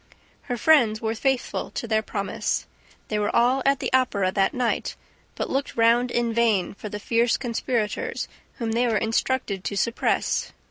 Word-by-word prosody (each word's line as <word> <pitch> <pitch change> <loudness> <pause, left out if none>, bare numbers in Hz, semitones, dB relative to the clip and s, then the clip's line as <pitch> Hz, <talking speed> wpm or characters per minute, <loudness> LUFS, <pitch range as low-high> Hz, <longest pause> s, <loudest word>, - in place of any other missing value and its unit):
Her 245 - -1
friends 235 -6 +4
were 220 0 -1
faithful 265 +2 -1
to 235 - -5
their 220 -1 +2
promise. 200 -2 -2 0.4
They 210 - 0
were 210 - -1
all 245 +3 +3
at 275 0 +4
the - - -3
Opera 205 -8 +2
that 195 0 +2
night, 250 -2 -1 0.4
but - - -2
looked 275 +1 -2
round 235 +2 +4
in 240 -1 0
vain 220 -6 +2
for 210 +1 -8
the 210 - -5
fierce 230 +3 +2
conspirators 235 -2 -2 0.3
whom 230 -3 -3
they 240 +2 +2
were 225 -2 +2
instructed 225 -2 -1
to 200 - -3
suppress. 230 +4 0
230 Hz, 170 wpm, -24 LUFS, 215-245 Hz, 0.4 s, friends